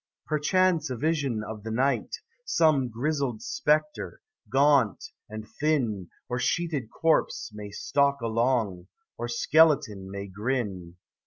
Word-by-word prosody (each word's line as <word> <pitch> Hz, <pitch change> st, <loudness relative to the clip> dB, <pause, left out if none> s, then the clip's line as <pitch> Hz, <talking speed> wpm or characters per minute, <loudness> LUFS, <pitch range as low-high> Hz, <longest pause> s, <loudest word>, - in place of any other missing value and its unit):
Perchance 165 Hz, +1 st, +2 dB
a 125 Hz, -, -3 dB
vision 140 Hz, -6 st, 0 dB
of 110 Hz, -1 st, -7 dB
the 110 Hz, -, -6 dB
night, 130 Hz, +5 st, 0 dB, 0.3 s
Some 155 Hz, -, +2 dB
grizzled 130 Hz, -1 st, -2 dB
spectre, 150 Hz, 0 st, 0 dB, 0.3 s
gaunt 135 Hz, -, +3 dB, 0.3 s
and 110 Hz, 0 st, -7 dB
thin, 120 Hz, -, 0 dB, 0.2 s
Or 125 Hz, 0 st, -2 dB
sheeted 140 Hz, -1 st, -1 dB
corpse, 160 Hz, -6 st, 0 dB
may 105 Hz, -1 st, -7 dB
stalk 140 Hz, +6 st, +1 dB
along, 115 Hz, -5 st, 0 dB, 0.3 s
Or 120 Hz, -, -2 dB
skeleton 120 Hz, -6 st, +3 dB
may 100 Hz, 0 st, -5 dB
grin. 100 Hz, -4 st, -3 dB
125 Hz, 115 wpm, -27 LUFS, 110-150 Hz, 0.3 s, gaunt